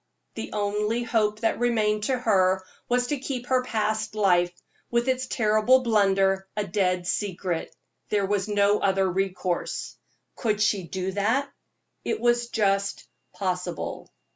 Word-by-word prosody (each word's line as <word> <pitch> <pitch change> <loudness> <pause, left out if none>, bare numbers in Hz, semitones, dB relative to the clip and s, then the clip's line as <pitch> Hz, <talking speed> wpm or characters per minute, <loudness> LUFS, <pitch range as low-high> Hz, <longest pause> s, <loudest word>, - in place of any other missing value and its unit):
The 225 - -6
only 210 +3 0
hope 215 -2 0
that 225 - +1
remained 215 -3 +1
to 260 +1 +1
her 190 -5 +2 0.2
was 245 0 +2
to 285 +2 -2
keep 255 -2 -4
her 255 0 +2
past 215 -2 -1
life, 180 -4 +3 0.4
with 235 +1 +1
its 260 0 0
terrible 220 +3 +3
blunder, 195 -4 +2
a 210 - 0
dead 185 -4 0
secret 180 -3 -2 0.3
there 205 -2 +1
was 195 0 0
no 205 0 +3
other 195 -1 +2
resource. 185 -1 -2 0.4
Could 215 -4 -1
she 210 -2 +2
do 190 +2 -3
that? 225 +8 0 0.5
It 440 - -1
was 240 0 +2
just 200 -3 0 0.2
possible. 180 -2 -4
210 Hz, 140 wpm, -26 LUFS, 195-235 Hz, 0.5 s, life